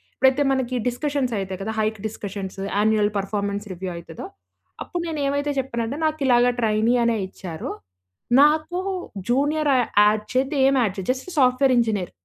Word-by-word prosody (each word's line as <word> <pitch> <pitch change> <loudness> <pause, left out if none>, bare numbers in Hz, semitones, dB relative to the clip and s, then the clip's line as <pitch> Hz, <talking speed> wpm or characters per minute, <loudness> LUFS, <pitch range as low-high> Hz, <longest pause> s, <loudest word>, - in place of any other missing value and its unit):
ఎప్పుడైతే 265 +2 +3
మనకి 260 -1 -1
డిస్కషన్స్ 265 0 -1
అయితాయి 190 -1 -5
కదా! 220 +3 -3
Hike 215 0 -1
discussions, 195 -2 -7 0.2
annual 210 0 +2
performance 200 +1 -2
review 185 +1 -5
అయితదో. 165 -1 -9 0.6
అప్పుడు 350 - -4
నేను 315 -2 -3
ఏమైతే 285 +1 0
చెప్పానంటే, 235 0 -3
నాకిలాగా 260 -6 +3
ట్రైనీ 220 +2 +2
అనే 235 -1 +2
ఇచ్చారు. 175 -4 -7 0.7
నాకు 310 +4 +3 0.5
జూనియర్ 290 +4 +2
య - - +4 0.2
యాడ్ 210 0 +2
చేయొద్దు, 265 +3 0
ఏమి 270 -1 +3
యాడ్ 200 -4 -1
చేయొద్దు. 190 +5 0
Just 260 +7 -9
software 255 0 +4
engineer 215 -6 -1
235 Hz, 145 wpm, -23 LUFS, 205-275 Hz, 0.7 s, య